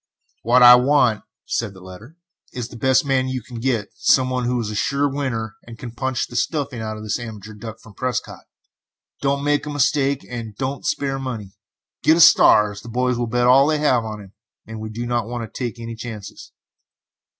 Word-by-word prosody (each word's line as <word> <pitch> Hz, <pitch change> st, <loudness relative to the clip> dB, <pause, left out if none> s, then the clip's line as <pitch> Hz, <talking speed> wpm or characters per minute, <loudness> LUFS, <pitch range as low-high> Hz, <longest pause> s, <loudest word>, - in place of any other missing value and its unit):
"What 125 Hz, +2 st, +4 dB
I 120 Hz, 0 st, +11 dB
want," 125 Hz, -4 st, +2 dB, 0.2 s
said 105 Hz, -4 st, -3 dB
the -, -, -12 dB
letter, 95 Hz, -, -13 dB, 0.4 s
"is 125 Hz, -2 st, -5 dB
the -, -, -12 dB
best 130 Hz, +4 st, +2 dB
man 130 Hz, -2 st, +1 dB
you 130 Hz, -2 st, -4 dB
can 120 Hz, 0 st, -9 dB
get. 115 Hz, -4 st, -1 dB
Some 130 Hz, -1 st, +2 dB
one 125 Hz, -1 st, -1 dB
who 125 Hz, 0 st, 0 dB
is 110 Hz, -2 st, -3 dB
a -, -, -5 dB
sure 140 Hz, +7 st, +1 dB
winner, 120 Hz, -6 st, -3 dB
and 115 Hz, -1 st, -10 dB
can 120 Hz, 0 st, -8 dB
punch 130 Hz, +1 st, -2 dB
the 120 Hz, -, -13 dB
stuffing 140 Hz, -2 st, -2 dB
out 110 Hz, -1 st, -4 dB
of 110 Hz, -, -9 dB
this 110 Hz, +2 st, -2 dB
amateur 110 Hz, -3 st, -8 dB
duck 110 Hz, +1 st, -9 dB
from 110 Hz, -, -16 dB
Prescott. 130 Hz, +3 st, -4 dB, 0.8 s
Don't 140 Hz, 0 st, 0 dB
make 145 Hz, +1 st, 0 dB
a -, -, -3 dB
mistake, 140 Hz, -1 st, +1 dB
and 115 Hz, -4 st, -7 dB
do 130 Hz, -, -2 dB
not 135 Hz, +1 st, -5 dB
spare 135 Hz, -1 st, -1 dB
money. 115 Hz, -7 st, -6 dB, 0.5 s
Get 160 Hz, -, +4 dB
a -, -, +1 dB
star, 105 Hz, -9 st, +6 dB
as 105 Hz, 0 st, -10 dB
the 120 Hz, -, -11 dB
boys 125 Hz, +1 st, 0 dB
will 120 Hz, -, -1 dB
bet 120 Hz, +1 st, +1 dB
all 135 Hz, +3 st, +6 dB
they 155 Hz, 0 st, +2 dB
have 150 Hz, -6 st, +2 dB
on 110 Hz, -1 st, -6 dB
him, 100 Hz, 0 st, -15 dB, 0.3 s
and 110 Hz, 0 st, -8 dB
we 110 Hz, 0 st, -6 dB
do 115 Hz, +3 st, -5 dB
not 120 Hz, -2 st, -1 dB
want 120 Hz, 0 st, -4 dB
to -, -, -28 dB
take 120 Hz, -1 st, -4 dB
any 115 Hz, 0 st, -6 dB
chances." 110 Hz, -3 st, -9 dB
120 Hz, 215 wpm, -21 LUFS, 110-130 Hz, 0.8 s, I